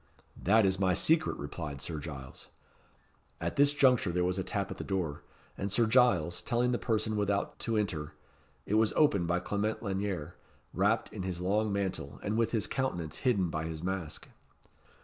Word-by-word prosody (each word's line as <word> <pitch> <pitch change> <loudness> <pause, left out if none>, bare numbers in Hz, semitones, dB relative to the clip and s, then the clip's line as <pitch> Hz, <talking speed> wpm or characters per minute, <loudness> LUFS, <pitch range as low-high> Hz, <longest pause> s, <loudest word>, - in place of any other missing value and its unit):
"That 110 +3 +5
is 95 0 +1
my 95 -2 +3
secret," 160 - +2
replied 70 0 -6
Sir 80 +2 -4
Giles. 70 -4 -8 0.9
At - - -3
this 145 0 +6
juncture 130 -9 +3
there 90 +1 +1
was 90 +1 0
a - - -1
tap 100 +1 -2
at - - -6
the - - -5
door, 90 -7 -2 0.3
and 100 0 -3
Sir 115 +3 +4
Giles, 110 -8 +3
telling 120 +1 +1
the 120 - 0
person 110 -2 0
without 100 -1 -1
to 115 -1 -1
enter, 85 -8 -2 0.5
it - - -3
was 110 - +1
opened 100 - +3
by 85 +1 +1
Clement 105 +4 -2
Lanyere, 95 -5 -2 0.4
wrapped - - +1
in - - -5
his 90 -2 -3
long 105 +4 +1
mantle, 95 -8 -3
and 105 - -1
with 115 0 +2
his 110 -3 +1
countenance 90 - -2
hidden 100 -9 +1
by 80 0 -2
his 80 0 -5
mask. 95 -4 -4
95 Hz, 180 wpm, -31 LUFS, 85-110 Hz, 0.9 s, this